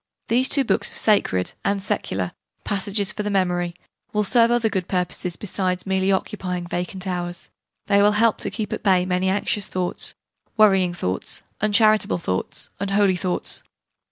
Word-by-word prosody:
These 255 +3 +3
two 280 - +4
books - - +1
of - - -4
sacred, 95 - +2
and 200 0 0
secular, 95 - -2 0.3
passages 200 0 0
for 210 - -4
memory 175 -3 0 0.4
will 210 0 +2
serve 230 +2 +4
other 240 -1 +2
good 190 -5 -2
purposes 180 -1 -1
besides 185 -2 -2
merely 190 0 +1
occupying 185 -2 -2
vacant 180 +2 -3
hours: 175 -1 -4 0.4
they 200 -1 +3
will 210 +1 +5
help 220 +1 +3
to - - -2
keep 215 -3 -4
at - - -4
bay 185 -3 +3
many 185 +1 0
anxious 205 +1 0
thoughts, 180 -1 -1 0.4
worrying 195 -5 +4
thoughts, 95 - -3 0.2
uncharitable 215 -1 +3
thoughts, 95 - -3
unholy 200 -1 +2
thoughts. 180 0 -1
190 Hz, 155 wpm, -22 LUFS, 180-210 Hz, 0.4 s, will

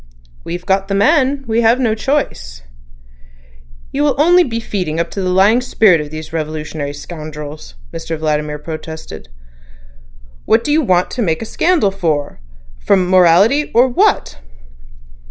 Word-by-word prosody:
"We've 175 +1 -6
got 195 0 0
the 195 - -2
man; 275 +4 +2
we 230 0 0
have 230 +2 +3
no 235 -4 +1
choice." 65 - -3 1.3
"You 280 - -2
will 290 -2 +2
be 290 - +2
only 340 -9 +3
feeding 180 -8 -3
up 170 - -2
the 200 - -4
lying 200 +6 +3
spirit 205 -9 +3
of 150 - -7
these 155 +1 -9
revolutionary 155 -2 -4
scoundrels," 150 - -9 0.2
Mr 165 - -5
Vladimir 150 -1 -2
protested. 160 - -9 1.2
"What 225 +1 +3
do 295 - -2
you 310 +2 +3
want 180 - +1
to 250 - -3
make 165 -2 -1
a - - -6
scandal 315 - +1
for?—from 145 - -2
morality—or 210 - +4
what?" 390 - +1
185 Hz, 135 wpm, -16 LUFS, 155-240 Hz, 1.3 s, morality—or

